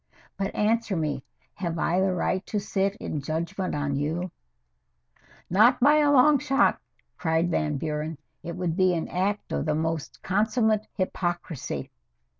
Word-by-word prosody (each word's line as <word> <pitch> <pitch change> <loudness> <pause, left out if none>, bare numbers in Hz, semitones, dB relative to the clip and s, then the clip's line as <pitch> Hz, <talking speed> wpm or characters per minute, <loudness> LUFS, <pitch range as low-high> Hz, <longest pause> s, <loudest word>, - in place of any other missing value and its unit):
But 195 0 -3
answer 220 -1 +1
me. 150 -4 -1 0.3
Have 170 -3 -3
I 175 +2 +1
the 190 0 +2
right 185 +1 0
to 210 - -1
sit 200 -1 -1
in 150 -7 -4
judgment 170 +6 -2
on 145 -1 -1
you 160 +5 -2 0.6
" - - -40 0.3
"Not 215 +7 +5
by 290 +4 +6
a 295 -1 +4
long 285 +1 +6
shot!" 275 0 +2 0.4
cried 165 +1 +1
Van 150 -3 0
Buren. 150 +2 -3 0.2
"It 170 - -6
would 180 -3 -1
be 185 -1 +3
an 165 - -2
act 200 +3 -1
of - - -1
the 150 - +2
most 160 -1 -3
consummate 215 +2 +1
hypocrisy." 175 -5 -3
180 Hz, 155 wpm, -26 LUFS, 160-210 Hz, 0.6 s, by